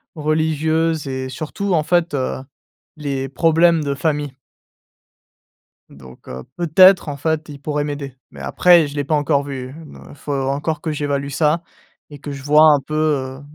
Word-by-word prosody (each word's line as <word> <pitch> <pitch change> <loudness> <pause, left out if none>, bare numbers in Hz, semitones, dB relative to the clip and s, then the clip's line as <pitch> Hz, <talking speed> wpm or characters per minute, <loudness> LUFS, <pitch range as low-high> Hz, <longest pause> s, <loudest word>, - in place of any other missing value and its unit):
religieuses 155 0 0
et 130 -1 -4
surtout, 170 +8 -4
en 160 - +3
fait, 175 +1 +1
heu, 130 -2 -2 0.6
les 135 -3 -3
problèmes 165 +2 +3
de 140 -1 -2
famille. 145 -2 -2 1.6
Donc 65 -2 -15
heu, 65 +1 -7
peut-être, 175 +1 +5
en 145 - -4
fait, 160 +2 -2
il 140 -1 -10
pourrait 150 0 -2
m'aider, 140 -3 -6
mais - - -13
après 175 -3 +4
je 145 - -8
l'ai 145 - -1
pas 155 - -1
encore 145 -1 +1
vu, 130 -2 -7
me - - -13
faut 145 0 -7
encore 140 +3 -2
que 160 -3 -3
j'évalue 140 -1 -2
ça 155 +4 +1 0.5
et 145 - -10
que 145 - -7
je 135 -1 -7
vois 150 +2 +5
un 145 - +3
peu, 155 +3 -7
heu, 140 -4 -1
150 Hz, 170 wpm, -19 LUFS, 140-160 Hz, 1.6 s, peut-être